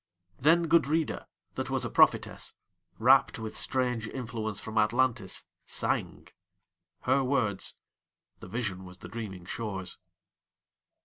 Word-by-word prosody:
Then 165 +5 +4
Gudrida, 160 -1 +2 0.3
that - - -3
was - - 0
a - - -2
prophetess, - - +3 0.4
Rapt 130 +4 +5
with 110 -1 -5
strange 125 -4 0
influence 110 -4 -4
from 110 +1 -1
Atlantis, 115 -2 +1 0.2
sang:Her 135 +2 -2
words: 125 -7 0 0.6
the - - -10
vision 95 -3 -3
was 90 0 -10
the 90 - -10
dreaming 95 -4 -6
shore's. 95 -3 -4
115 Hz, 110 wpm, -30 LUFS, 100-130 Hz, 0.6 s, Rapt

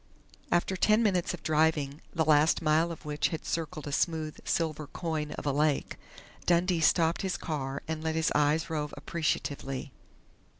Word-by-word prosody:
After 175 +2 +2
ten 215 +4 +4
minutes 185 -5 +1
of 170 - -18
driving, 155 -2 +1
the 160 -2 0
last 155 +1 +4
mile 160 +2 +2
of 165 - -9
which 150 0 0
had 160 - -5
circled 155 -2 -3
a 145 - -5
smooth 155 +1 0
silver 155 -3 -1
coin 155 -1 -3
of - - -7
a 145 - +2
lake, 150 +1 +1 0.5
Dundee 175 0 +3
stopped 165 +1 +3
his 190 -1 -1
car 140 -4 -4
and 160 0 -3
let 160 0 -1
his 160 0 +1
eyes 150 +2 +2
rove 150 -3 -3
appreciatively. 140 -4 -2
160 Hz, 165 wpm, -29 LUFS, 150-165 Hz, 0.5 s, ten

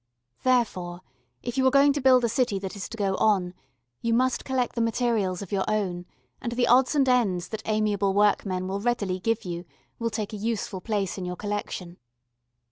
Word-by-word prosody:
Therefore 185 -9 0 0.4
if 245 +2 -3
you 260 - +4
are - - +7
going 280 +1 +5
to 285 - -2
build 255 -1 +5
a - - +3
city 230 -3 +1
that 190 +1 -5
is 200 - -6
to 230 - -8
go 200 -2 0
on, 190 -5 +2 0.5
you 230 0 +1
must 255 +1 +1
collect 260 -2 -1
the 235 - -1
materials 225 -5 0
of 195 - -11
your 195 -2 +1
own, 185 -5 -1 0.3
and 235 - -3
the 245 0 +2
odds 255 +4 +4
and 275 -2 +3
ends 200 -9 +2
that 220 -1 -5
amiable 210 -2 +1
workmen 200 -3 +2
will 195 +1 -2
readily 205 -6 0
give 225 +2 -1
you 175 -1 -4 0.4
will 230 0 0
take 215 -1 -4
a - - -4
useful 210 -3 -3
place 200 -2 -2
in 180 - -4
your 180 0 -4
collection. 190 -3 -4
215 Hz, 200 wpm, -26 LUFS, 190-240 Hz, 0.5 s, are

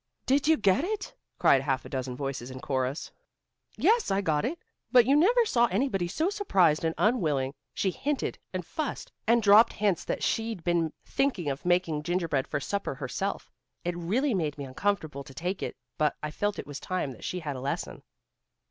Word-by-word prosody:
"Did 275 +2 +2
you 320 0 +5
get 195 +5 +3
it?" 410 +2 -3 0.2
cried 135 - +5
half 135 -1 -1
a - - -8
dozen 130 -2 -3
voices 135 -2 -4
in 130 0 -7
chorus. 130 +2 -2 0.7
"Yes, 460 0 +3
I 195 - +2
got 155 -5 +1
it, 305 +8 -2 0.3
but 245 -2 +7
you 275 +3 +4
never 460 +10 +5
saw 240 - +3
anybody 195 -4 0
so 320 - 0
surprised 190 - +3
and 160 0 0
unwilling. 150 - +1 0.2
She 190 - +1
hinted 285 +7 -2
and 185 -2 -4
fussed, 305 - -4 0.2
and 235 0 +4
dropped 210 +3 +7
hints 200 -5 +1
that - - -2
she'd 225 -5 -1
been 170 -2 +1
thinking 195 - 0
of 135 +4 -6
making 175 -4 +2
gingerbread 165 -4 0
for 150 - -2
supper 200 +2 -3
herself. 145 +9 -4 0.3
It 175 0 -1
really 225 +11 0
made 155 -6 -1
me 140 - -5
uncomfortable 155 -1 -2
to 135 0 -14
take 180 +3 -3
it, - - -4 0.2
but 155 -1 +2
I 150 - -2
felt 205 +6 -1
it - - -5
was 145 -1 -7
time 185 -7 -2
that 125 - -12
she 180 - -3
had 145 -3 -4
a 130 - -6
lesson." 135 - -3
180 Hz, 190 wpm, -28 LUFS, 145-230 Hz, 0.7 s, but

